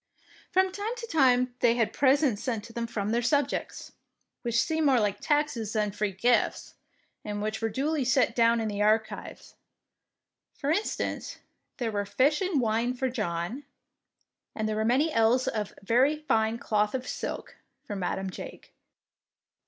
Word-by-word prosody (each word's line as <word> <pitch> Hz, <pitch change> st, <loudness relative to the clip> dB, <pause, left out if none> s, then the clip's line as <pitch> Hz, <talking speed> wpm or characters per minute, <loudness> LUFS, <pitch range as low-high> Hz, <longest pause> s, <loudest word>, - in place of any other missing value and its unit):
From 375 Hz, 0 st, +2 dB
time 415 Hz, +5 st, -3 dB
to 470 Hz, -, -5 dB
time 255 Hz, -, +3 dB
they 235 Hz, -1 st, +4 dB
had 230 Hz, -3 st, 0 dB
presents 270 Hz, -5 st, +3 dB
sent 230 Hz, -4 st, -2 dB
to 230 Hz, +1 st, -12 dB
them 235 Hz, 0 st, -3 dB
from 210 Hz, -3 st, -2 dB
their 235 Hz, +1 st, +1 dB
subjects, 285 Hz, +3 st, -1 dB, 0.5 s
which 235 Hz, -1 st, 0 dB
seem 315 Hz, +4 st, +1 dB
more 260 Hz, -3 st, +4 dB
like 205 Hz, -2 st, 0 dB
taxes 290 Hz, -8 st, 0 dB
than 210 Hz, -2 st, 0 dB
free 205 Hz, 0 st, -2 dB
gifts, 235 Hz, +6 st, +1 dB, 0.5 s
and 205 Hz, -1 st, -4 dB
which 215 Hz, +1 st, -3 dB
were 225 Hz, -, 0 dB
duly 285 Hz, +6 st, -1 dB
set 250 Hz, -2 st, +2 dB
down 230 Hz, 0 st, +4 dB
in 220 Hz, -, -1 dB
the 205 Hz, -1 st, -3 dB
archives. 220 Hz, +1 st, -1 dB, 1.0 s
For 285 Hz, +1 st, -1 dB
instance, 410 Hz, +7 st, -2 dB, 0.4 s
there 235 Hz, -4 st, -2 dB
were 205 Hz, -1 st, -2 dB
fish 285 Hz, -, +2 dB
and 365 Hz, -6 st, +1 dB
wine 235 Hz, +1 st, 0 dB
for 260 Hz, +1 st, -1 dB
John, 210 Hz, +2 st, -3 dB, 0.9 s
and 215 Hz, -1 st, -1 dB
there 215 Hz, -, -1 dB
were 215 Hz, -, 0 dB
many 270 Hz, +8 st, +2 dB
ells 230 Hz, +3 st, +3 dB
of 210 Hz, -3 st, -2 dB
very 255 Hz, +8 st, +3 dB
fine 225 Hz, -7 st, +1 dB
cloth 210 Hz, 0 st, 0 dB
of 255 Hz, -1 st, -4 dB
silk -, -, -5 dB
" -, -, -51 dB
for 205 Hz, -, -5 dB
Madam 190 Hz, 0 st, -2 dB
Jake. -, -, -10 dB
235 Hz, 165 wpm, -28 LUFS, 215-275 Hz, 1.0 s, they